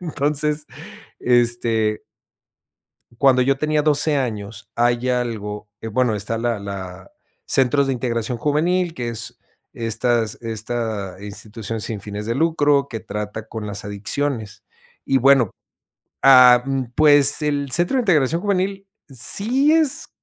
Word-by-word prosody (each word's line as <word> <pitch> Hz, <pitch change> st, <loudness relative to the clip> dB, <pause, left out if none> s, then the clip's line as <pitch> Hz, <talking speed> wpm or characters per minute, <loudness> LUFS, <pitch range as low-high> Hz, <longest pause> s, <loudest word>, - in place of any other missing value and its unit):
Entonces, 150 Hz, -2 st, -2 dB, 0.5 s
este 115 Hz, -3 st, +1 dB, 1.2 s
cuando 130 Hz, -1 st, +4 dB
yo 135 Hz, +2 st, +2 dB
tenía 150 Hz, 0 st, +1 dB
12 150 Hz, 0 st, +2 dB
años 110 Hz, -5 st, -4 dB
hay 120 Hz, +1 st, +1 dB
algo, 105 Hz, -4 st, -3 dB
eh, 110 Hz, -, -6 dB
bueno, 120 Hz, +1 st, +1 dB
está 105 Hz, +2 st, -3 dB
la 115 Hz, -1 st, -1 dB
la 95 Hz, -2 st, -8 dB, 0.4 s
centros 135 Hz, +2 st, +2 dB
de 135 Hz, -, 0 dB
integración 120 Hz, -1 st, -2 dB
juvenil, 170 Hz, +6 st, 0 dB
que 120 Hz, -6 st, -4 dB
es 115 Hz, 0 st, -7 dB, 0.3 s
estas 115 Hz, -1 st, -1 dB
esta 110 Hz, -3 st, -4 dB
institución 105 Hz, +2 st, -6 dB
sin 105 Hz, -1 st, -4 dB
fines 105 Hz, +1 st, -6 dB
de 115 Hz, -, -1 dB
lucro, 145 Hz, -2 st, +2 dB
que 115 Hz, -, -6 dB
trata 105 Hz, +1 st, -6 dB
con 110 Hz, -2 st, -6 dB
las 100 Hz, -1 st, -6 dB
adicciones. 105 Hz, +2 st, -4 dB, 0.4 s
Y 135 Hz, -, +2 dB
bueno, 135 Hz, -4 st, +4 dB, 0.7 s
ah, 125 Hz, -2 st, +8 dB
mm, 135 Hz, -1 st, -1 dB
pues, 145 Hz, -1 st, +5 dB
el 145 Hz, -2 st, -1 dB
centro 175 Hz, -, +2 dB
de -, -, +3 dB
integración 165 Hz, -, +2 dB
juvenil, 195 Hz, 0 st, -1 dB, 0.2 s
sí 230 Hz, -, +1 dB
es 315 Hz, -4 st, +1 dB
125 Hz, 130 wpm, -21 LUFS, 110-145 Hz, 1.2 s, ah